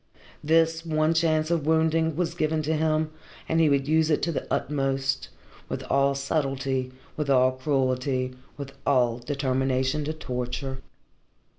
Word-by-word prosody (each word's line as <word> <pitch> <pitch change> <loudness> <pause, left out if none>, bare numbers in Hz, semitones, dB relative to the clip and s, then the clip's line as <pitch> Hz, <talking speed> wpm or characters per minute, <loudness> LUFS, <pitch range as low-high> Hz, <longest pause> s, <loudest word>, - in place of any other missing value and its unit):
This 165 +1 +3
one 155 -1 +1
chance 160 -1 +1
of 160 -4 0
wounding 160 0 +2
was 170 0 -1
given 155 -2 0
to 160 +2 0
him 155 0 +1 0.4
and 165 - +1
he 160 -2 +5
would 140 -1 +1
use 160 +1 +3
it 150 - +1
to 170 - +1
the - - -5
utmost, 135 -1 -1 0.4
with - - -4
all 140 0 +3
subtlety, 135 -2 -1 0.2
with 150 -2 -3
all 130 -1 +5
cruelty, 130 -1 0 0.2
with 140 -1 -6
all 125 -4 +2
determination 130 +1 0
to 155 - -2
torture. 130 -2 -4
145 Hz, 145 wpm, -26 LUFS, 130-160 Hz, 0.4 s, he